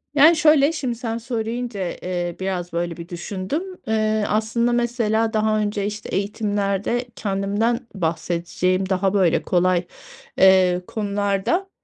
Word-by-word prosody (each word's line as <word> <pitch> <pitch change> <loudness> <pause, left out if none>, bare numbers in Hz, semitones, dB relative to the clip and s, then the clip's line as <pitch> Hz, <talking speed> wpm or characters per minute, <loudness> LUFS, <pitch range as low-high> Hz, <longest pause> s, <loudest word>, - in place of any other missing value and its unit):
Yani, 310 +4 +7
şöyle, 300 -1 +5
şimdi 265 -7 -3
sen 230 -1 -3
söyleyince, 230 -4 -3
eee, 175 -1 -3
biraz 185 -2 -3
böyle 170 0 -2
bir 170 0 -9
düşündüm. 185 - -4 0.2
Eee, 215 -1 +1
aslında 220 +3 +1
mesela 230 -2 +1
daha 215 0 +2
önce, 205 -1 -1
işte, 210 +1 -5
eğitimlerde 205 +3 -1
kendimden 210 +5 -1
bahsedeceğim 175 +2 -1
daha, 190 0 +1
böyle, 185 -5 +3
kolay, 180 0 +2 0.5
eee, 185 -1 +5
konularda, 205 - -1
205 Hz, 120 wpm, -22 LUFS, 185-230 Hz, 0.5 s, Yani